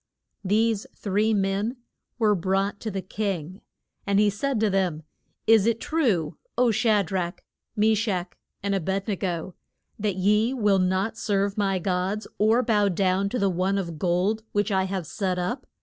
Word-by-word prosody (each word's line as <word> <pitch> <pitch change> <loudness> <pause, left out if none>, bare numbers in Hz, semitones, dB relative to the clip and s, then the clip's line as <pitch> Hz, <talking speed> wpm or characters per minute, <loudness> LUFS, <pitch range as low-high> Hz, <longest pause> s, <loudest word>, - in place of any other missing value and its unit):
These 215 +2 +1
three 210 +2 +1
men 200 +4 0 0.4
were 220 -3 +3
brought 195 +2 0
to 220 - -4
the 195 -2 -4
king, 190 -2 -4 0.5
and 200 0 +3
he 210 -1 +4
said 245 +4 -1
to 220 - +3
them, 180 -5 0 0.4
Is 225 -2 +5
it 230 -1 +1
true, 230 - 0 0.2
O 245 -1 +4
Sha 215 -1 +3
drach, 175 0 -3 0.3
Me 220 +1 +3
shach, 195 -5 -1 0.3
and 200 0 0
A 195 - +1
bed 190 +4 -2
ne 210 - 0
go 180 -1 -3 0.5
that 205 -2 0
ye 210 +6 +2
will 205 -5 +3
not 190 +5 0
serve 200 -2 0
my 195 -2 +1
gods 185 +3 -1
or 220 +4 +4
bow 210 -4 +3
down 190 +1 +1
to 250 - -2
the 200 - +2
one 190 +2 0
of 170 -5 -4
gold 185 +6 +1
which 205 +1 +1
I 190 -1 +2
have 190 -2 -3
set 185 +2 -2
up? 180 +9 -3
200 Hz, 175 wpm, -25 LUFS, 185-215 Hz, 0.5 s, Is